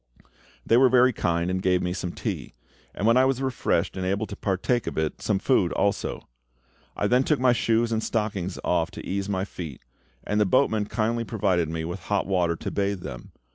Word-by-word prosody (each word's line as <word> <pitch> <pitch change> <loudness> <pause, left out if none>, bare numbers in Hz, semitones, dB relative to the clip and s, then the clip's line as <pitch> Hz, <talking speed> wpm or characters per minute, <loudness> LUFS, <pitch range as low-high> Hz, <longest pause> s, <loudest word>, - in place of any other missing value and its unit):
They 115 - +4
were 130 0 +6
very 125 0 +5
kind, 85 -2 0
and 95 0 -1
gave 90 -1 +2
me 90 0 -1
some 90 -2 -4
tea; - - -5 0.4
and 100 - -2
when 115 +2 +5
I 130 - +5
was 135 -1 +1
refreshed 125 -9 0
and 95 - -3
able 100 +3 0
to 100 - -8
partake 100 +5 -1
of - - -4
it, 80 -1 -2
some 105 - +1
food 95 -4 +2
also. 100 0 -1 0.7
I - - 0
then 125 +5 +3
took 150 +1 +1
my 125 -1 +4
shoes 115 0 +1
and 110 -1 0
stockings 100 -5 -2
off 85 -2 +1
to - - -8
ease 100 +1 -2
my 95 -1 -1
feet, 80 -11 -8 0.4
and 105 0 0
the - - +4
boatman 110 -2 +2
kindly 115 +1 -1
provided 95 -8 0
me 80 0 -3
with 85 +3 -5
hot 100 +3 -1
water 90 -3 +1
to - - -5
bathe 100 -2 -1
them. - - -8
100 Hz, 210 wpm, -25 LUFS, 90-115 Hz, 0.7 s, were